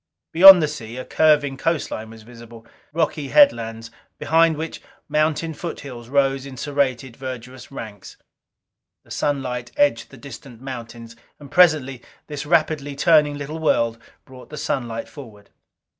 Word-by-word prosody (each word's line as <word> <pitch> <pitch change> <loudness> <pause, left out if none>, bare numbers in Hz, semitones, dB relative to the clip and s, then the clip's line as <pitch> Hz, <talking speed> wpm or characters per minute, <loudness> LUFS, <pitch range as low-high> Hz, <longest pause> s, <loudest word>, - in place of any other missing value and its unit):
Beyond 185 0 +9
the - - +1
sea, 120 -5 -8
a 130 - -6
curving 145 -3 +2
coastline 135 -8 -3
was 110 -1 -13
visible. 115 0 -14 0.3
Rocky 155 -2 -1
headlines, 115 - +2 0.3
behind 165 0 +2
which 160 +1 -6 0.3
mountain 155 +1 0
foothills 135 -8 -8
rose 135 -1 +1
in 130 -2 -10
serrated, 130 -3 -2
verdurous 130 -1 -9
ranks. 110 -7 -10 0.9
The - - -20
sunlight 125 -4 -3
edged 290 0 +1
the 135 - -14
distant 125 -1 -12
mountains; 115 -3 -9 0.2
and 145 -2 -13
presently 155 -8 +3 0.2
this 150 -1 -7
rapidly 155 -3 0
turning 150 -1 +3
little 145 +3 -6
world 115 -7 0 0.3
brought 130 -1 -14
the 150 - -9
sunlight 120 -6 -3
forward. 110 -8 -14
135 Hz, 135 wpm, -21 LUFS, 120-155 Hz, 0.9 s, Beyond